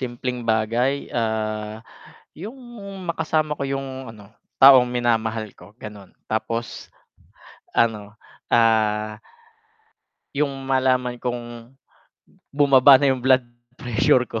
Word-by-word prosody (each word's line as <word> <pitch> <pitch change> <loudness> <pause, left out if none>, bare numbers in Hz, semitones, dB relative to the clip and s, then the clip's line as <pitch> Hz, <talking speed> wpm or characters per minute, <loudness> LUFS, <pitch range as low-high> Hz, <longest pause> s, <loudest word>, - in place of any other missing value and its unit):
Simpleng 125 -1 -4
bagay, 115 +5 0
ah, 110 -2 -2 0.5
yung 205 - -9 0.6
makasama 155 -2 -1
ko - - -4
yung, 135 0 -3 0.3
ano, 105 -2 -16 0.3
taong 135 -2 +9
minamahal 115 -3 -1
ko, 105 - -18
ganun. 105 -3 -11 0.2
Tapos, 115 +1 -3 0.8
ano, 105 -2 -1 0.3
ah 110 -2 +2 1.1
Yung 140 -2 -2
malaman 130 -2 +1
kong 120 -1 -6 0.8
bumaba 140 -1 +6
na 135 0 +2
yung 130 - -4
blood 130 0 +3 0.3
pressure 125 +1 +2
ko. 115 -2 -5
120 Hz, 100 wpm, -22 LUFS, 110-135 Hz, 1.1 s, taong